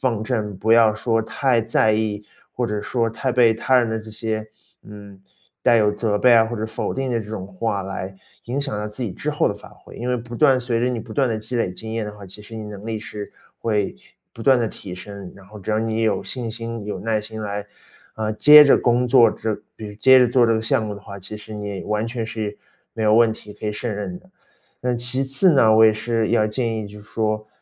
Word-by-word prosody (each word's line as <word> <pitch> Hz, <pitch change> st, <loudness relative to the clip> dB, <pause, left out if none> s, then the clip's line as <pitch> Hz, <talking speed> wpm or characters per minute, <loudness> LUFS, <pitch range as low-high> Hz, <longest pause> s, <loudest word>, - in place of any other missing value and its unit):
放 110 Hz, -, -4 dB
正， 110 Hz, -5 st, -2 dB
不 110 Hz, +4 st, 0 dB
要 115 Hz, -2 st, +6 dB
说 115 Hz, +1 st, 0 dB
太 125 Hz, +2 st, +1 dB
在 110 Hz, -1 st, +2 dB
意， 105 Hz, -1 st, -1 dB, 0.3 s
或 125 Hz, -, -1 dB
者 105 Hz, -2 st, -3 dB
说 115 Hz, +1 st, -1 dB
太 125 Hz, +4 st, -2 dB
被 120 Hz, -3 st, +5 dB
他 130 Hz, +3 st, +2 dB
人 120 Hz, -2 st, +2 dB
的 110 Hz, 0 st, -2 dB
这 110 Hz, -, -11 dB
些， 110 Hz, 0 st, -4 dB, 0.4 s
嗯， 100 Hz, -2 st, -12 dB, 0.4 s
带 120 Hz, -, +4 dB
有 105 Hz, -2 st, +3 dB
责 105 Hz, 0 st, -1 dB
备 125 Hz, +3 st, +5 dB
啊， 115 Hz, -1 st, +6 dB
或 120 Hz, +1 st, -4 dB
者 110 Hz, -, -3 dB
否 110 Hz, 0 st, -4 dB
定 135 Hz, -1 st, -2 dB
的 115 Hz, -, 0 dB
这 105 Hz, -1 st, -8 dB
种 110 Hz, -4 st, -5 dB
话， 100 Hz, +1 st, -3 dB
来 95 Hz, 0 st, -6 dB, 0.3 s
影 125 Hz, +4 st, -2 dB
响 135 Hz, -6 st, -3 dB
到 105 Hz, 0 st, -3 dB
自 105 Hz, +5 st, -6 dB
己 105 Hz, -, -3 dB
之 -, -, -4 dB
后 -, -, +1 dB
的 -, -, -2 dB
发 -, -, -13 dB
挥。 -, -, -15 dB
因 120 Hz, -, -4 dB
为 125 Hz, -, +1 dB
不 120 Hz, 0 st, -7 dB
断 130 Hz, -, +5 dB
随 120 Hz, -2 st, -1 dB
着 125 Hz, -, +1 dB
你 120 Hz, -2 st, -2 dB
不 110 Hz, -, -12 dB
断 135 Hz, +1 st, +2 dB
地 110 Hz, -, -1 dB
积 110 Hz, +3 st, -4 dB
累 105 Hz, -6 st, 0 dB
经 110 Hz, +4 st, -8 dB
验 115 Hz, -2 st, -2 dB
的 105 Hz, -, -7 dB
话， 100 Hz, -, -10 dB
其 95 Hz, +3 st, -11 dB
实 110 Hz, +2 st, -11 dB
你 110 Hz, -, -6 dB
能 105 Hz, -1 st, -9 dB
力 110 Hz, -, -2 dB
是 105 Hz, -1 st, -8 dB, 0.3 s
会 105 Hz, -3 st, 0 dB, 0.4 s
不 115 Hz, -, -10 dB
断 130 Hz, +2 st, +5 dB
地 115 Hz, -2 st, 0 dB
提 90 Hz, -3 st, -9 dB
升， 100 Hz, 0 st, -9 dB
然 100 Hz, -, -15 dB
后 105 Hz, +2 st, -12 dB
只 100 Hz, +2 st, -4 dB
要 110 Hz, -, +2 dB
你 110 Hz, 0 st, -1 dB
有 110 Hz, -2 st, +1 dB
信 120 Hz, -3 st, -4 dB
心， 115 Hz, 0 st, -6 dB
有 100 Hz, -3 st, -4 dB
耐 110 Hz, -1 st, 0 dB
心 110 Hz, +1 st, -8 dB
来， 105 Hz, -1 st, -4 dB, 0.5 s
呃， 110 Hz, -1 st, -2 dB
接 150 Hz, +7 st, +9 dB
着 140 Hz, -, +6 dB
工 120 Hz, +1 st, +2 dB
作， 120 Hz, -2 st, +6 dB
之 110 Hz, -2 st, -4 dB
比 110 Hz, -, -7 dB
如 105 Hz, -, -10 dB
接 130 Hz, +5 st, +6 dB
着 125 Hz, -, +5 dB
做 120 Hz, 0 st, +4 dB
这 115 Hz, -, +3 dB
个 110 Hz, -, 0 dB
项 110 Hz, 0 st, +1 dB
目 105 Hz, -, -4 dB
的 100 Hz, -, -10 dB
话， 100 Hz, -1 st, -9 dB
其 95 Hz, +3 st, -8 dB
实 110 Hz, +1 st, -11 dB
你 105 Hz, -1 st, -5 dB
也 -, -, -7 dB
完 105 Hz, +1 st, -1 dB
全 115 Hz, -1 st, -3 dB
是 110 Hz, -2 st, -5 dB, 0.4 s
没 110 Hz, -, -5 dB
有 105 Hz, 0 st, +4 dB
问 115 Hz, -1 st, +5 dB
题， 105 Hz, -1 st, -10 dB
可 105 Hz, -, -9 dB
以 -, -, 0 dB
胜 120 Hz, +3 st, -4 dB
任 180 Hz, -, -5 dB
的。 185 Hz, +1 st, -24 dB, 0.5 s
那 125 Hz, 0 st, 0 dB
其 125 Hz, +3 st, -1 dB
次 135 Hz, +7 st, +3 dB
呢， 115 Hz, -6 st, +5 dB
我 110 Hz, -, +8 dB
也 110 Hz, -, +5 dB
是 115 Hz, 0 st, -1 dB
要 110 Hz, -2 st, +3 dB
建 115 Hz, +1 st, -2 dB
议 110 Hz, -, -5 dB
就 105 Hz, +1 st, -12 dB
是 105 Hz, -, -16 dB
说， 110 Hz, -1 st, -2 dB
110 Hz, 280 characters per minute, -22 LUFS, 105-120 Hz, 0.5 s, 接